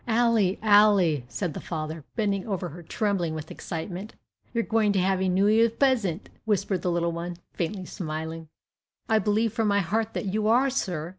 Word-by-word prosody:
"Ally, 225 Hz, -5 st, +3 dB
Ally," 205 Hz, -7 st, +5 dB
said 125 Hz, +8 st, -3 dB
the -, -, -5 dB
father, 155 Hz, -1 st, -5 dB
bending 200 Hz, -3 st, -1 dB
over 185 Hz, -4 st, -2 dB
her, 175 Hz, +4 st, -10 dB
trembling 175 Hz, -2 st, -1 dB
with 155 Hz, -1 st, -7 dB
excitement. 180 Hz, +5 st, -6 dB, 0.4 s
"You 230 Hz, -, 0 dB
are -, -, -3 dB
going 220 Hz, -2 st, +2 dB
to 195 Hz, -, +2 dB
have 190 Hz, +1 st, +1 dB
a 190 Hz, -, +1 dB
New 190 Hz, +3 st, +3 dB
'Ear's 225 Hz, +2 st, +4 dB
pesent," 230 Hz, -, +1 dB, 0.2 s
whispered 200 Hz, -4 st, 0 dB
the 180 Hz, -, 0 dB
little 170 Hz, 0 st, 0 dB
one, 170 Hz, +1 st, -5 dB, 0.2 s
faintly 185 Hz, +2 st, -3 dB
smiling. 160 Hz, -2 st, -5 dB, 0.6 s
"I 220 Hz, -1 st, +3 dB
believe 215 Hz, +2 st, +1 dB
from 225 Hz, -2 st, 0 dB
my 200 Hz, 0 st, +3 dB
heart 220 Hz, +5 st, -1 dB
that -, -, -2 dB
you 210 Hz, +2 st, 0 dB
are, 255 Hz, +4 st, +4 dB
sir!" 175 Hz, -, -2 dB
195 Hz, 190 wpm, -26 LUFS, 170-220 Hz, 0.6 s, Ally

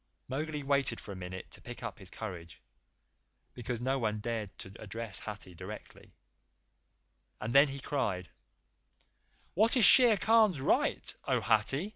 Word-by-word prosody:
Mowgli 150 Hz, +2 st, -3 dB
waited 135 Hz, -4 st, +1 dB
for -, -, -9 dB
a -, -, -6 dB
minute 95 Hz, 0 st, -8 dB
to -, -, -10 dB
pick 120 Hz, 0 st, -9 dB
up 115 Hz, -2 st, -6 dB
his 95 Hz, -2 st, -5 dB
courage, 90 Hz, -7 st, -8 dB, 0.9 s
because 120 Hz, -1 st, -4 dB
no 135 Hz, +2 st, 0 dB
one 110 Hz, -3 st, -1 dB
cared 110 Hz, -2 st, -3 dB
to 95 Hz, -, -9 dB
address 110 Hz, -1 st, -6 dB
Hathi 105 Hz, -3 st, -8 dB
directly, 95 Hz, +5 st, -11 dB, 1.2 s
and 110 Hz, +3 st, -4 dB
then 140 Hz, +2 st, +7 dB
he 140 Hz, 0 st, -6 dB
cried: 100 Hz, -, -2 dB, 1.2 s
"What 220 Hz, +7 st, +4 dB
is 230 Hz, -, +7 dB
Shere 245 Hz, -5 st, +8 dB
Khan's 220 Hz, -7 st, +4 dB
right, 130 Hz, -, +1 dB
O -, -, +1 dB
Hathi?" 120 Hz, -, +1 dB
115 Hz, 145 wpm, -31 LUFS, 105-140 Hz, 1.2 s, Shere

